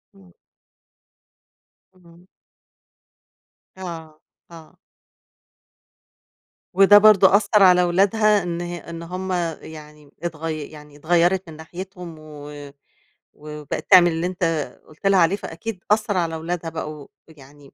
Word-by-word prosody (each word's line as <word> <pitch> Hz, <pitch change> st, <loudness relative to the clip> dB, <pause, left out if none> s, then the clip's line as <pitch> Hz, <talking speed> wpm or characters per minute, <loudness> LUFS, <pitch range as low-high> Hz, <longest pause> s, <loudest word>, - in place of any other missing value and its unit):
إمم. 95 Hz, -3 st, -20 dB, 1.6 s
اهم. 175 Hz, 0 st, -21 dB, 1.5 s
آه، 165 Hz, -4 st, -9 dB, 0.3 s
آه. 165 Hz, +1 st, -15 dB, 2.0 s
وده 195 Hz, +2 st, +7 dB
برضو 205 Hz, -2 st, +7 dB
أثَّر 205 Hz, +1 st, +3 dB
على 180 Hz, -1 st, +6 dB
أولادها 200 Hz, +3 st, +2 dB
إن 175 Hz, 0 st, -4 dB
ه 175 Hz, 0 st, -5 dB
إن 170 Hz, 0 st, -7 dB
همَّ 185 Hz, +2 st, -6 dB, 0.3 s
يعني 150 Hz, -2 st, -13 dB
اتغي 160 Hz, -2 st, -5 dB
يعني 150 Hz, -1 st, -14 dB
اتغيَّرِت 175 Hz, +3 st, +1 dB
من 155 Hz, -, -11 dB
ناحيتهم 175 Hz, +1 st, -10 dB
و-و 145 Hz, -2 st, -11 dB, 0.6 s
وبقِت 150 Hz, +4 st, -8 dB
تعمِل 175 Hz, -2 st, +7 dB
اللي 165 Hz, +2 st, -2 dB
أنت 185 Hz, 0 st, -6 dB, 0.4 s
قُلت 155 Hz, +6 st, -5 dB
لها 195 Hz, -1 st, +4 dB
عليه، 170 Hz, +3 st, +3 dB
فأكيد 190 Hz, +3 st, -8 dB
أثَّر 210 Hz, -2 st, +1 dB
على 165 Hz, -2 st, -1 dB
أولادها 165 Hz, +1 st, -4 dB
بقوا 155 Hz, -2 st, -7 dB, 0.2 s
يعني 145 Hz, -2 st, -18 dB
170 Hz, 110 wpm, -21 LUFS, 155-185 Hz, 2.0 s, وده